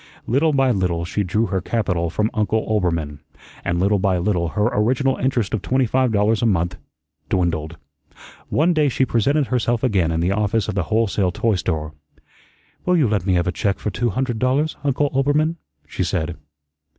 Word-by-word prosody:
Little 145 +7 +2
by 135 -2 +3
little 90 -5 0
she 100 +4 -2
drew 105 +5 0
her 95 -1 -2
capital 90 -5 -1
from 105 +6 -1
Uncle 110 0 0
Oelbermann, 85 -8 -1 0.4
and 85 0 -1
little 100 +2 +2
by 95 -1 +1
little 90 -1 0
her 105 +5 0
original 130 +5 +1
interest 120 -6 -1
of 110 - 0
twenty 130 +6 +1
five 130 +1 +1
dollars 105 +1 +2
a 120 - +3
month 90 -4 0 0.5
dwindled. 85 -3 -1 0.7
One 170 +4 +2
day 150 -3 +2
she 130 +1 +1
presented 140 +5 +1
herself 120 -1 0
again 95 -10 +2
in 80 - -1
the 85 +3 +1
office 105 +1 0
of 105 - -2
the 90 -3 -1
whole 115 +1 +3
sale 95 -3 0
toy 110 +6 0
store. 80 -4 -2 0.9
"Will 180 0 +2
you 145 -6 +3
let 100 -3 -1
me 95 - +3
have 85 -1 +1
a 90 - 0
check 100 +1 -1
for 105 - -3
two 120 +5 -1
hundred 120 +1 -2
dollars, 135 +5 +1
Uncle 145 +1 +1
Oelbermann?" 145 +4 +1 0.3
she - - -3
said. 80 +1 -2
105 Hz, 190 wpm, -21 LUFS, 90-130 Hz, 0.9 s, by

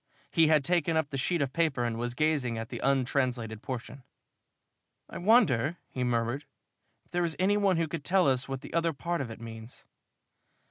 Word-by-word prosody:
He 165 -1 +4
had 155 -2 +4
taken 170 -1 +1
up 160 -3 0
the - - -5
sheet 170 +2 +1
of 130 -1 -4
paper 155 -7 +1
and 120 -1 -1
was 120 +1 -3
gazing 145 -6 +1
at 115 +1 -5
the - - -5
untranslated 125 -4 0
portion. 130 +2 -6 1.1
"I - - -7
wonder," 175 - +3
he 130 - -2
murmured, 120 +3 -1 0.6
"if - - -22
there 175 0 +1
is 165 -2 -1
any 195 +3 +3
one 200 -3 +2
who 165 -1 +1
could 160 -1 -5
tell 185 0 +3
us 130 -1 +1
what 135 -1 -4
the - - -10
other 165 0 +1
part 170 +3 -2
of 130 - -4
it 110 - -8
means?" 115 0 -10
140 Hz, 195 wpm, -29 LUFS, 120-170 Hz, 1.1 s, He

